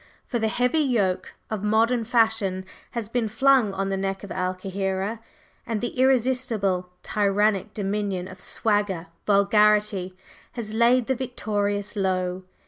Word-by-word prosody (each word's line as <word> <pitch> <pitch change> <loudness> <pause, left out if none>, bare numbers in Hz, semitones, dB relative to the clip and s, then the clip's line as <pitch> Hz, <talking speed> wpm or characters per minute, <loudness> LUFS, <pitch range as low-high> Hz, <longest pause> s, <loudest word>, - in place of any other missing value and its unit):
For 240 - -2
the 220 - +1
heavy 250 +7 +1
yoke 220 -10 0 0.2
of 210 -2 -3
modern 225 +3 +2
fashion 220 -5 +1 0.3
has 235 -4 -3
been 230 -1 -1
flung 255 -1 +4
on 195 0 -2
the 195 - -1
neck 195 0 -3
of 200 - -8
Al 185 0 -1
Kahira, 195 +3 -3 0.5
and 225 -2 -1
the 240 - -2
irresistible, 245 -8 +1
tyrannic 205 0 +1
dominion 200 -2 -2
of 185 0 -11
"swagger" 205 -4 0 0.2
vulgarity 205 -2 +3 0.4
has 220 -3 -5
laid 235 +2 +4
The 265 - +1
Victorious 210 -5 -2
low. 185 -2 -1
210 Hz, 135 wpm, -25 LUFS, 195-230 Hz, 0.5 s, flung